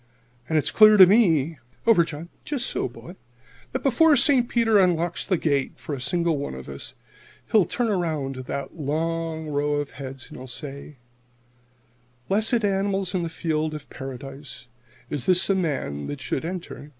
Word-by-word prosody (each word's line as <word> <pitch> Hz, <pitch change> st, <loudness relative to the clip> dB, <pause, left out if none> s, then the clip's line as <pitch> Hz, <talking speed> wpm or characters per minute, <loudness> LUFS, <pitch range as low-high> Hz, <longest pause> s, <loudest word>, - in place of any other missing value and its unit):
"And 160 Hz, -, +2 dB
it's 150 Hz, -, +1 dB
clear 215 Hz, -1 st, +7 dB
to 190 Hz, -, +11 dB
me 165 Hz, -, +3 dB, 0.3 s
over, 225 Hz, -7 st, +6 dB
John! 165 Hz, +1 st, -8 dB, 0.3 s
so, 245 Hz, -, -2 dB
boy! -, -, -12 dB, 0.5 s
that -, -, -3 dB
before 295 Hz, +4 st, +5 dB
St. 260 Hz, -3 st, +4 dB
Peter 225 Hz, -3 st, +3 dB
unlocks 175 Hz, -2 st, +1 dB
the 185 Hz, -, +2 dB
gate 140 Hz, -4 st, 0 dB
for 155 Hz, -, -7 dB
a 135 Hz, -, -4 dB
single 170 Hz, +2 st, 0 dB
one 140 Hz, -, -4 dB
of 65 Hz, 0 st, -9 dB
us, -, -, -8 dB, 0.6 s
he'll 210 Hz, -5 st, +5 dB
turn 240 Hz, +6 st, -1 dB
around 160 Hz, -9 st, -1 dB
to 130 Hz, -, -7 dB
that 140 Hz, +2 st, -5 dB
long 160 Hz, +1 st, -2 dB
row 145 Hz, 0 st, 0 dB
of 145 Hz, -1 st, -2 dB
heads, 135 Hz, -1 st, -8 dB
and -, -, -10 dB
he'll 130 Hz, -, -9 dB
say: 140 Hz, +2 st, -8 dB, 1.3 s
"'Blessed 220 Hz, +3 st, +2 dB
animals 195 Hz, -1 st, 0 dB
in 185 Hz, -, 0 dB
the 170 Hz, -, -3 dB
fields 155 Hz, -1 st, -2 dB
of 150 Hz, -1 st, -10 dB
Paradise, 135 Hz, +1 st, -8 dB, 0.5 s
is 140 Hz, -4 st, -3 dB
this 185 Hz, +2 st, +4 dB
a -, -, +4 dB
man 135 Hz, -, -2 dB
that 145 Hz, -, -5 dB
should 135 Hz, +2 st, -3 dB
enter 180 Hz, 0 st, -5 dB
in?' 145 Hz, -, -12 dB
165 Hz, 175 wpm, -24 LUFS, 140-195 Hz, 1.3 s, to